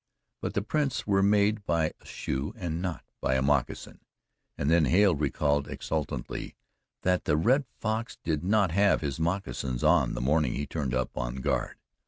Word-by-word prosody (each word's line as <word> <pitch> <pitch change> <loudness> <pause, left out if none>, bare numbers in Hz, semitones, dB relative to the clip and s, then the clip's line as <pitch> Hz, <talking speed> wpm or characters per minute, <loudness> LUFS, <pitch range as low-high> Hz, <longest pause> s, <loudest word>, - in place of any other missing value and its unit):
But - - -3
the 100 - +1
prints 145 +3 -1
were 100 -1 +3
made 105 +1 +3
by 80 -4 +1
a - - -21
shoe 70 +2 -4
and 85 -2 -3
not 90 -3 -3 0.2
by 65 - +1
a 65 - +2
moccasin, 70 -2 0 0.6
and 70 - -1
then 80 0 +4
Hale 95 +6 +4
recalled 75 -1 0
exultantly 75 -5 -4 0.5
that 90 0 +1
the 75 - +2
Red 130 - +3
Fox 110 +1 -2
did 80 -1 -1
not 100 -1 +3
have 100 +3 +3
his 70 -1 -3
moccasins 80 -7 -2
on - - +3
the - - -3
morning 75 0 +2
he 75 - -2
turned 70 -6 -2
up 65 -1 -2
on - - -3
guard. 65 - -1
80 Hz, 175 wpm, -28 LUFS, 70-100 Hz, 0.6 s, then